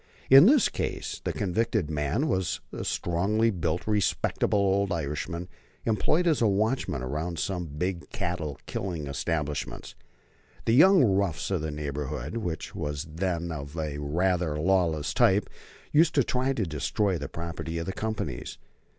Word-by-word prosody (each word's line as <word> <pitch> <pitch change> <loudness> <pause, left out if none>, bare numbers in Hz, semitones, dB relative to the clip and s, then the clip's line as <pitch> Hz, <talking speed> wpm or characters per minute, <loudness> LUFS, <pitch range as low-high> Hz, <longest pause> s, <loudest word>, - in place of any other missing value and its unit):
In 135 +7 +10
this 275 -1 +6
case - - -4
the - - -1
convicted 100 -3 0
man 75 - 0
was 95 - 0
a - - -4
strongly 105 +7 +1
built, 85 -3 -2
respectable 105 0 +1
old 100 0 +2
Irishman 85 +2 -3 0.4
employed 155 +10 +2
as 160 -6 +2
a 115 - +5
watchman 105 - 0
around 80 +6 -3
some 90 +3 -2
big 85 +4 -3
cattle 80 -5 -3
killing 95 -9 -4
establishments. 75 +1 -3 0.7
The 115 - +3
young 185 +5 +7
roughs 95 - +1
of 95 -5 0
the 80 - -2
neighborhood, 75 - -4
which 85 -8 -4
was 75 +1 -3
then 85 -1 -2
of 70 0 -6
a 75 -2 -3
rather 85 +1 0
lawless 80 -4 +1
type, 95 +2 +3 0.4
used 160 +3 +4
to 140 - +5
try 130 +3 0
to 110 -6 -1
destroy 85 +5 0
the - - -5
property 85 0 -5
of 85 - -3
the 95 - -3
companies. 85 - -4
85 Hz, 150 wpm, -27 LUFS, 75-105 Hz, 0.7 s, In